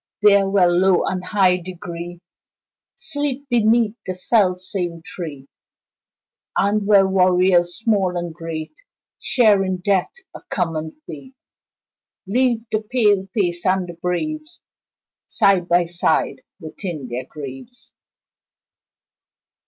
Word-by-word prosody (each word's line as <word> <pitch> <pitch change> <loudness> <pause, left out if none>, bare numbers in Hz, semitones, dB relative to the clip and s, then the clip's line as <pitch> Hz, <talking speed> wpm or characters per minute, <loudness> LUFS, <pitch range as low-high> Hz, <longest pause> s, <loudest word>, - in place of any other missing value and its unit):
There, 200 -2 +5
where 195 -2 +4
low 180 +1 +3
and 185 -1 -2
high 185 -2 +3
degree 175 -1 -8 0.7
Sleep 290 - -3
beneath 225 -1 +3
the 185 - -4
self 185 -1 +2
same 175 -3 -4
tree, 155 -7 -8 1.1
And 200 +1 +1
where 200 -2 +5
warriors 180 -2 +3
small 200 -6 +1
and 175 -1 -4
great, 160 -1 -6 0.5
Share 215 -6 +3
in 185 -1 -2
death 185 0 0 0.2
a - - -10
common 160 - -3
fate, 265 0 -10 0.9
Leave 235 +2 +1
the 215 - 0
pale 210 -4 +1
face 175 -5 0
and 185 -1 +1
the 175 - -7
braves 310 - -4 0.7
Side 190 -3 +2
by 175 0 +3
side 165 -5 0 0.2
within 160 -4 -6
their 125 +1 -5
graves. 150 - -10
185 Hz, 115 wpm, -21 LUFS, 175-210 Hz, 1.1 s, There